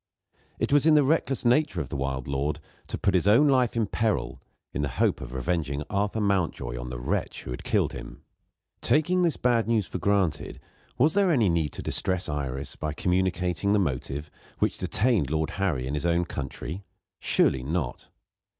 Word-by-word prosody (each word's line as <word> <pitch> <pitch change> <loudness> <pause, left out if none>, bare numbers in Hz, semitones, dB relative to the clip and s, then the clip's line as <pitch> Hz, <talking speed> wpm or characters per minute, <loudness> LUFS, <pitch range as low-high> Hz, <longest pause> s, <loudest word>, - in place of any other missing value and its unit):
It - - -1
was 145 +2 +5
in 155 - +6
the 150 - +6
reckless 135 -3 +1
nature 125 - +3
of 70 - -4
the - - -5
wild 65 -1 -3
lord 70 +2 -1 0.3
to - - -4
put 100 - +1
his 90 +1 +2
own 115 +9 +6
life 130 -4 +3
in 115 -2 +2
peril, 70 - -1 0.3
in - - -1
the 70 - 0
hope - - +2
of 60 - -7
revenging 70 +1 -2
Arthur 100 +2 0
Mountjoy 95 - 0
on 60 0 -6
the 60 - -5
wretch - - -2
who - - -7
had 60 - -6
killed - - +1
him. - - -9 0.6
Taking 175 +5 +2
this 170 -3 +2
bad 120 -2 +2
news 115 -4 +2
for - - -4
granted, 100 -5 0 0.4
was 150 +5 +4
there 200 -2 +3
any 115 - +3
need 80 -4 0
to - - -6
distress 95 0 0
Iris 70 -2 -4
by 75 -1 -3
communicating 90 +2 0
the - - +4
motive 75 -3 -2 0.3
which - - 0
detained 100 - +1
Lord 80 +1 -1
Harry 80 -10 0
in 65 - -3
his 75 +3 -1
own 85 +1 +2
country? 75 +5 -6 0.4
Surely 65 - +2
not! 70 -1 -3
90 Hz, 185 wpm, -27 LUFS, 70-110 Hz, 0.6 s, in